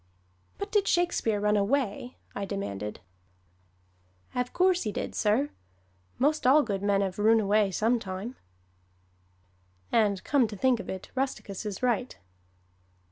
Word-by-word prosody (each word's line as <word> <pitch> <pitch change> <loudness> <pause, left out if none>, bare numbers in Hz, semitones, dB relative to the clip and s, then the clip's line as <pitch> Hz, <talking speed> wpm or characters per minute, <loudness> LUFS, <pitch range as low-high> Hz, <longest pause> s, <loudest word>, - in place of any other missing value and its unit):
"But 400 +1 -5
did 410 -2 +2
Shakespeare 340 -12 +1
run 210 +1 +2
away?" 245 +2 0 0.2
I 200 - -4
demanded. 105 - -4 1.3
"Ave 250 0 -1
coorse 365 0 +3
he 215 - -2
deed, - - -4
sir; 230 +8 +1 0.7
'most 295 0 +2
all 290 +3 +6
good 200 -4 -2
men 200 -1 +2
'ave 190 +1 -3
roon 225 +2 +5
away 210 0 +3
sometime!" 215 +2 -1 1.6
And 205 -4 +2
come 275 -5 +3
to 210 - -7
think 255 +1 +2
of - - -7
it 190 0 -6
Rusticus 255 -6 -3
is 205 +3 -6
right. 250 +1 0
220 Hz, 135 wpm, -28 LUFS, 200-260 Hz, 1.6 s, all